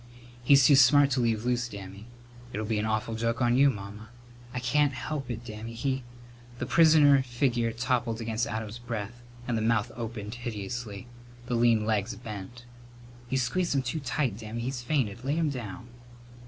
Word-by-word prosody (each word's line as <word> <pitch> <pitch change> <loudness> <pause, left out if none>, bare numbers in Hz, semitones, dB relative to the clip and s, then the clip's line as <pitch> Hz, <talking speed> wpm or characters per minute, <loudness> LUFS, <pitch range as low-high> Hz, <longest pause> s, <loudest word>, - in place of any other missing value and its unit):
"He's 140 +1 +6
too 145 - +7
smart 140 +2 +6
to 130 - +1
leave 115 -2 0
loose, 120 -1 0
Dammy." 100 0 -9 0.4
"It'll 110 0 -3
be 110 0 0
an 110 - -1
awful 110 +1 -1
joke 115 +1 -1
on 120 -1 +3
you, 140 +2 +6
Mamma." 105 -1 -7 0.4
"I 125 - -3
can't 140 +3 +2
help 135 0 -4
it, 120 0 -5
Dammy. 110 0 -7
He 135 +2 -1 0.3
" 120 0 -20
The 125 - -3
prisoner 150 -2 +6
figure 120 -2 0
toppled 120 0 -1
back 115 - -5
against 115 +1 -1
Adam's 110 0 -5
breast 115 -2 -5 0.3
and 120 - 0
the 110 - 0
mouth 110 -1 +1
opened 110 -3 -5
hideously. 115 -2 -5 0.4
The 125 - -3
lean 115 -2 +3
legs 110 0 0
bent. 115 +1 -8 0.6
"You 130 - 0
squeezed 145 +7 0
him 135 - +1
too 130 +6 -2
tight, 135 -5 -1
Dammy. 110 +1 -5
He's 125 +1 -3
fainted. 120 -4 -1
Lay 140 +3 0
him 160 -3 +1
down." 120 -2 -7
120 Hz, 180 wpm, -28 LUFS, 110-130 Hz, 0.6 s, too